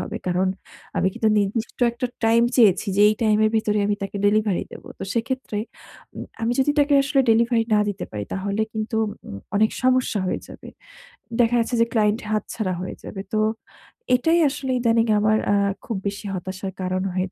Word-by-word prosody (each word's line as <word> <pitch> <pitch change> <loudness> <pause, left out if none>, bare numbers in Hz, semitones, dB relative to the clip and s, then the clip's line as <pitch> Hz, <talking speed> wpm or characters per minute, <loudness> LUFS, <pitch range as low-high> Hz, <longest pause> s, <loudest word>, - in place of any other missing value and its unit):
হবে।" - - -5
কারণ, 180 +1 +1 0.5
আমি - - +2
কিন্তু 220 - +1
নির্দিষ্ট 210 +3 -2
একটা 245 +2 -3 0.2
টাইম 230 +1 +4
চেয়েছি 215 -5 +4
যে, - - +3
এই 215 - +2
টাইমের 215 0 +3
ভেতরে 210 -1 +1
আমি 205 - +1
তাকে 195 +1 -4
ডেলিভারি 210 -2 +2
দেব। - - -11
তো - - -4
সেক্ষেত্রে 245 -2 -2 0.6
উম - - -5 0.2
আমি 230 +1 +1
যদি 270 +2 +3
তাকে 290 0 +4
আসলে 275 0 +2
ডেলিভারি 230 0 +3
না 210 - +4
দিতে 205 -1 -4
পারি, 105 -1 -4
তাহলে 200 +2 -1
কিন্তু 220 +1 -3 0.3
উম 100 - -7 0.2
অনেক 220 +1 +3
সমস্যা 255 -3 +2
হয়ে - - -2
যাবে। - - -11 0.7
দেখা 240 +1 +3
যাচ্ছে 230 +2 0
যে - - +5
ক্লায়েন্ট 215 -1 +2
হাতছাড়া 215 -2 -2
হয়ে 185 - -5
যাবে। 195 - -6
তো 215 - +2 0.8
এটাই 325 +7 +2
আসলে 265 -1 -4
ইদানিং 230 -1 +2
আমার 215 +1 +3 0.2
আ - - +4 0.3
খুব 225 - -3
বেশি 200 +1 -5
হতাশার 190 +1 -5
কারণ 185 0 -1
হয়ে 185 +1 -1
215 Hz, 180 wpm, -23 LUFS, 200-235 Hz, 0.8 s, যে